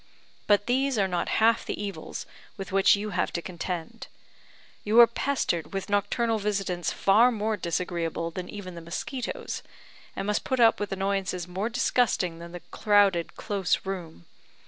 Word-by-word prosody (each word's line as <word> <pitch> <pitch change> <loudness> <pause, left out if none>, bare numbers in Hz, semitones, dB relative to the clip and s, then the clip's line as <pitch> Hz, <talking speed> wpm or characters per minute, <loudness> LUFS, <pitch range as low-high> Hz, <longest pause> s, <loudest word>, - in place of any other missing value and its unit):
"But 205 -1 +4
these 265 +1 +1
are 195 -2 +3
not 180 -2 -1
half 225 +1 +4
the - - -4
evils 200 -1 -5 0.3
with 195 0 -6
which 195 +1 +5
you 210 +1 -4
have - - 0
to - - -1
contend. 180 +4 -5 0.8
You 215 +3 +4
are 235 - +12
pestered 235 - -1
with 195 +1 -4
nocturnal 220 +3 +1
visitants 195 -4 -1
far 225 +6 +4
more 220 -1 -1
disagreeable 170 -2 -2
than 180 +1 -6
even 195 -3 -7
the 170 - -8
mosquitoes, 215 +10 -4 0.5
and 195 - -3
must 210 +1 0
put 260 - -1
up 230 -1 +5
with 205 - -3
annoyances 195 -2 -1
more 190 +5 -2
disgusting 235 -8 +1
than 170 0 -9
the 175 0 -8
crowded, 200 -5 +3
close 195 -3 -1
room. 170 - -6
195 Hz, 160 wpm, -27 LUFS, 180-220 Hz, 0.8 s, are